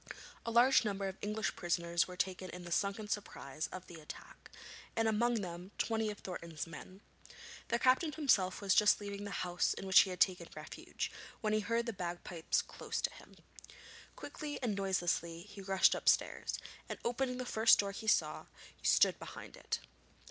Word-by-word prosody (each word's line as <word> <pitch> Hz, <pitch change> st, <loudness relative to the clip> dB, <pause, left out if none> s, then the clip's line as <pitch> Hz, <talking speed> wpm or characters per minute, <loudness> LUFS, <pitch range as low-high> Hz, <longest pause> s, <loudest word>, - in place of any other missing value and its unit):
A -, -, +2 dB
large 245 Hz, +3 st, +6 dB
number 200 Hz, -2 st, -1 dB
of 190 Hz, 0 st, -5 dB
English 215 Hz, +1 st, -1 dB
prisoners 170 Hz, -1 st, 0 dB
were 180 Hz, -1 st, -9 dB
taken 185 Hz, 0 st, -2 dB
in 180 Hz, +1 st, -8 dB
the 175 Hz, -, -8 dB
sudden 200 Hz, +3 st, 0 dB
surprise 155 Hz, -8 st, -4 dB
of 185 Hz, 0 st, -8 dB
the 170 Hz, -2 st, -11 dB
attack, 150 Hz, -, -11 dB, 0.5 s
and 225 Hz, 0 st, +2 dB
among 230 Hz, +1 st, +2 dB
them 175 Hz, 0 st, -6 dB
twenty 220 Hz, -1 st, 0 dB
of 210 Hz, -, -5 dB
Thornton's 170 Hz, -5 st, -6 dB
men. 180 Hz, +4 st, -11 dB, 0.7 s
The 235 Hz, -, +1 dB
captain 260 Hz, +6 st, +3 dB
himself 215 Hz, -13 st, +2 dB
was 195 Hz, -2 st, +3 dB
just 210 Hz, 0 st, +5 dB
leaving 205 Hz, 0 st, -5 dB
the 200 Hz, -, -3 dB
house 175 Hz, 0 st, +1 dB
in -, -, -6 dB
which 190 Hz, -1 st, +8 dB
he 195 Hz, -, +5 dB
had 180 Hz, -1 st, -5 dB
taken 185 Hz, -1 st, +3 dB
refuge, -, -, -5 dB, 0.3 s
when 215 Hz, -2 st, +1 dB
he 215 Hz, -, +3 dB
heard 230 Hz, +2 st, 0 dB
the 230 Hz, -, -3 dB
bagpipes 175 Hz, -2 st, -2 dB
close -, -, -5 dB
to -, -, -1 dB
him. -, -, -15 dB, 0.8 s
Quickly 300 Hz, -2 st, -6 dB
and 220 Hz, -5 st, 0 dB
noiselessly 175 Hz, -3 st, -1 dB
he 205 Hz, 0 st, -11 dB
rushed 195 Hz, 0 st, +4 dB
upstairs, -, -, +1 dB, 0.3 s
and -, -, -4 dB
opening 250 Hz, +1 st, 0 dB
the 255 Hz, -, -3 dB
first 225 Hz, -1 st, +6 dB
door 200 Hz, -1 st, 0 dB
he 220 Hz, +2 st, -7 dB
saw, 155 Hz, -7 st, +2 dB, 0.3 s
stood -, -, +4 dB
behind -, -, -9 dB
it. -, -, -3 dB
200 Hz, 175 wpm, -35 LUFS, 180-220 Hz, 0.8 s, which